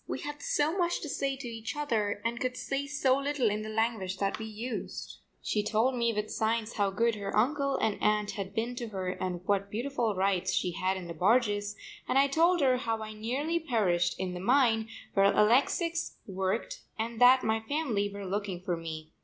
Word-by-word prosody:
We - - -3
had 295 0 -6
so 300 +4 +1
much 345 -2 0
to 305 - -5
say 275 -1 -1
to 260 -2 -7
each 225 +1 -5
other 220 -9 -1
and 235 +1 -1
could 255 0 -2
say 275 +2 -2
so 275 -3 +2
little 275 -5 +1
in 210 +1 -2
the 215 - -5
language 215 -4 -1
that 195 +1 -1
we 220 - -4
used. 225 +3 -6 0.2
She 210 - +1
told 220 +5 +1
me 235 -2 +1
with 210 -1 -3
signs 225 0 0
how 205 -2 +1
good 230 +4 +1
her 200 -1 -3
uncle 275 +4 +2
and 220 -5 0
aunt 210 0 +2
had 195 0 -6
been 235 +2 -1
to 240 -2 -3
her 190 -4 -3
and 180 -1 -4
what 200 0 +1
beautiful 235 -2 -1
rides 190 -1 +1
she 180 - 0
had 190 +1 -1
in 185 - -6
the 170 - -5
barges, 205 +2 +2 0.3
and - - +2
I 275 - +6
told 335 +4 +3
her 260 -2 +4
how 225 -3 -2
I 215 - -6
had 215 - -9
nearly 285 +9 -1
perished 195 - +1
in 185 -1 -2
the 180 - -5
mine 225 0 +3 0.3
where 195 -1 +4
Alexix 285 - +2
worked 190 - -2 0.2
and 225 +1 -3
that 255 +1 +7
my 220 0 +1
family 220 -5 -1
were 200 0 -7
looking 195 -1 -3
for 180 -1 0
me. 160 -1 -7
220 Hz, 210 wpm, -30 LUFS, 200-260 Hz, 0.3 s, that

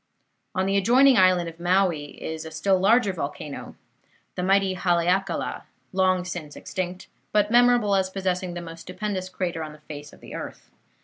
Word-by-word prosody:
On 185 - +1
the 195 +1 +2
adjoining 250 +7 +5
island 185 -3 +4
of 165 0 -9
Maui 175 -4 +1
is 160 0 -4
a 160 - -7
still 190 +3 +1
larger 205 +1 +4
volcano, 145 -3 -6 0.6
the - - -4
mighty 195 +1 +3
Haleakala, 180 +1 0 0.3
long 185 -1 +2
since 170 -5 -6
extinct, 185 -1 -5 0.3
but 210 0 +2
memorable 240 -3 +5
as 190 -1 +2
possessing 185 -2 -2
the 175 - -4
most 165 0 -9
stupendous 185 0 -4
crater 180 -3 -3
on 155 -1 -6
the 150 - -15
face 145 -1 -9
of - - -17
the - - -11
earth. - - -8
185 Hz, 170 wpm, -25 LUFS, 170-195 Hz, 0.6 s, adjoining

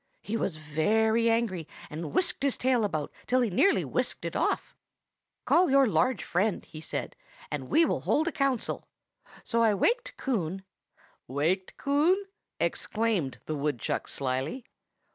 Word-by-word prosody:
He 215 - -3
was 185 -7 -1
very 220 +10 +2
angry, 220 -8 0 0.2
and 155 -1 -6
whisked 365 - +1
his 280 -2 +1
tail 250 -3 +2
about 155 -8 -2 0.2
till 255 +1 +3
he 235 -4 +1
nearly 390 - +3
whisked - - -2
it - - -4
off. - - 0 0.7
'Call 360 -1 +4
your 275 0 +6
large 255 -1 +1
friend,' 195 +3 0
he 155 -1 -10
said, - - -4 0.4
'and - - -4
we 330 +1 +5
will - - 0
hold 315 +2 +1
a - - +1
council.' 275 -6 -1 0.6
So 230 -1 0
I 220 -3 +4
waked 475 - 0
Coon—" 190 - -2 0.6
"Waked 165 +8 -1
Coon?" 320 +8 +2 0.3
exclaimed 210 - -1
the 155 - -3
woodchuck 145 -4 -2
slyly. 135 - -3
220 Hz, 145 wpm, -28 LUFS, 160-265 Hz, 0.7 s, your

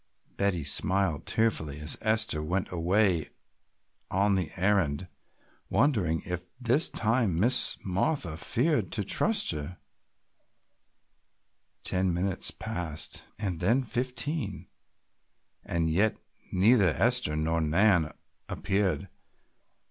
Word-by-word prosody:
Betty 100 -5 0
smiled 85 +1 0
tearfully 80 -11 0
as 75 0 0
Esther 110 -7 +1
went 90 +5 -2
away 90 -1 +1 0.8
on 100 +2 +2
the 90 -6 -1
errand, 95 -4 +1 0.6
wondering 100 - +1
if 90 -1 -5
this 125 +6 +3
time 110 -6 0
Miss 120 +6 +4
Martha 95 - -1
feared 120 - 0
to 105 - -1
trust 215 - +3
her. 75 +3 -6 2.1
Ten 95 0 0
minutes 90 +2 0
passed 80 -3 -5
and 95 -6 -3
then 115 +9 +2
fifteen 125 - -3 1.0
and 85 -1 -1
yet 100 +7 +1 0.3
neither 100 +1 +4
Esther 120 -10 +2
nor 80 +2 0
Nan 85 +1 +3 0.4
appeared. 95 -4 -1
95 Hz, 100 wpm, -28 LUFS, 85-110 Hz, 2.1 s, Miss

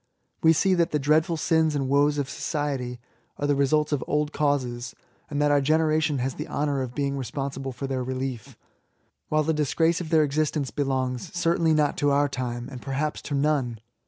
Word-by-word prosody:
We 160 - +6
see 190 +4 +3
that 170 -1 +2
the 150 - 0
dreadful 155 +4 +2
sins 160 -1 +2
and 135 -2 -1
woes 145 +2 +3
of 140 -2 -1
society 140 -4 -3 0.4
are 145 - -2
the 145 - +3
results 145 +2 +2
of 145 -4 0
old 150 0 0
causes, 130 -4 -1 0.3
and 145 - -2
that 145 0 +3
our 145 -1 +4
generation 155 0 +2
has 130 +1 -1
the - - -6
honour 145 -2 -1
of 125 -2 -5
being 140 -1 -1
responsible 135 +1 -4
for 130 +2 -6
their 130 -1 -2
relief, 130 -2 -5 0.7
while 155 0 +2
the 160 +2 +1
disgrace 160 +3 +1
of 165 - -6
their 160 -2 +4
existence 150 -1 -1
belongs, 130 -3 -2
certainly 165 -2 +2
not 150 -1 +1
to 145 - +2
our 145 +1 +3
time^ 120 -2 -4
and 130 -3 -9
perhaps 140 +3 -2
to 145 - -4
none. 140 -5 0
145 Hz, 190 wpm, -25 LUFS, 135-155 Hz, 0.7 s, We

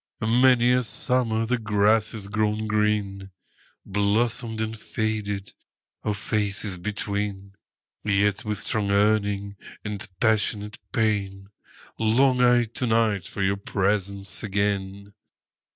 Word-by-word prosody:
Many 120 +2 +4
a 125 0 +3
summer 115 -2 +2
the 125 +2 0
grass 110 0 +2
has 105 -3 -5
grown 105 +1 0
green, 105 -2 0 0.6
Blossomed 110 +3 0
and 110 0 -2
faded, 105 -3 -3 0.5
our 105 - -1
faces 100 -2 -2
between:Yet, 100 0 -3
with 105 -1 -2
strong 105 0 -1
yearning 100 0 +1 0.3
and 105 -1 -4
passionate 105 -1 0
pain, 100 -3 -1 0.5
Long 125 +3 +3
I 120 -1 +5
to 120 +2 -4
night 110 -5 +2
for 100 - -3
your 95 +1 +1
presence 100 -1 -1
again. 100 -1 -2
105 Hz, 105 wpm, -25 LUFS, 100-110 Hz, 0.6 s, I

